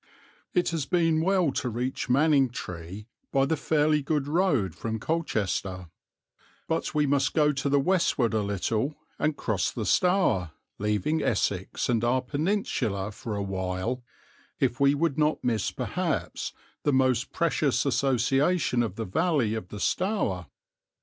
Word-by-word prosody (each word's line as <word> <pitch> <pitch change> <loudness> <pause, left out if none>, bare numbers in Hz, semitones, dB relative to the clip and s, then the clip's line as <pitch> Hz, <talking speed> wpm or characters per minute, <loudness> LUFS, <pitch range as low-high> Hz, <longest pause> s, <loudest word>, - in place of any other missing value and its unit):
It 175 - +3
has 160 -5 -2
been 165 -2 +2
well 180 -3 +2
to 130 - -2
reach 125 +3 -3
Manningtree 125 - +1 0.3
by 135 0 +3
the 160 - +1
fairly 150 0 +2
good 145 -1 -1
road 145 - +1
from 110 +5 -4
Colchester; 100 - -2 0.8
but 160 -1 -2
we 150 -1 +3
must 140 -1 +1
go 150 -2 +4
to 140 0 -2
the 140 0 +4
westward 140 -7 +2
a 110 - +2
little, 105 - -1 0.2
and 150 -1 0
cross 110 -4 0
the 110 - -4
Stour, 180 - +2 0.3
leaving 105 - 0
Essex 100 -6 -1
and 115 -2 +1
our 125 +2 +2
peninsula 140 - -1
for 105 +1 -5
a 100 - -2
while 95 +5 -2 0.6
if 120 - +1
we 140 +1 +4
would 155 -1 0
not 150 0 +1
miss 115 -4 0
perhaps - - -2 0.3
the 145 - +1
most 130 -1 +2
precious 150 -6 +1
association 135 +2 +2
of 110 -5 -2
the 115 - -3
valley 140 - +1
of 110 -5 -4
the 105 - -8
Stour. 180 - 0
130 Hz, 145 wpm, -27 LUFS, 105-155 Hz, 0.8 s, go